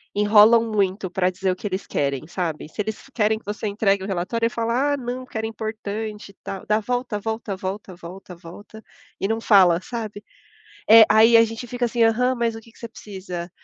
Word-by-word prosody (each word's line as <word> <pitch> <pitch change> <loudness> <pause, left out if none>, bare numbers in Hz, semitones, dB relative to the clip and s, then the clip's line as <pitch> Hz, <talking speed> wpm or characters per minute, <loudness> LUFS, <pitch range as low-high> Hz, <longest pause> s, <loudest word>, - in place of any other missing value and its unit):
enrolam 215 +2 +5
muito 195 -2 -1
pra 180 +1 +1
dizer 185 +1 -2
o - - -2
que 205 - -6
eles 190 0 -4
querem, 140 0 -2
sabe. 165 -4 -4
Se 210 - -4
eles 220 +4 -6
querem 220 -1 +1
que 220 - -17
você 210 +1 -4
entregue 200 -1 0
o - - -5
relatório, 195 +5 -2
aí - - +2
fala: 235 +5 0
"Ah, - - -1
não, 250 0 -5
porque 255 - -8
era 220 - -2
importante, 215 -1 -6
tal". 195 -1 -7
Dá 215 +1 +2
volta, 245 -1 -3
volta, 220 -1 -4
volta, 190 0 -6 0.5
volta 205 +6 -12 0.4
e 195 - +1
não 225 +1 -1
fala, 185 -6 +5
sabe. 215 -3 -7 0.7
É, 225 0 +10
aí 225 +2 +6
a 230 - +6
gente 225 +2 -6
fica 245 0 -2
assim: 235 0 -1
"Aham, 250 +3 +2
mas 235 -1 -1
o 225 - -8
que 230 +1 -19
que - - -23
você 230 - -8
precisa? 185 -5 -8
215 Hz, 205 wpm, -22 LUFS, 195-230 Hz, 0.7 s, É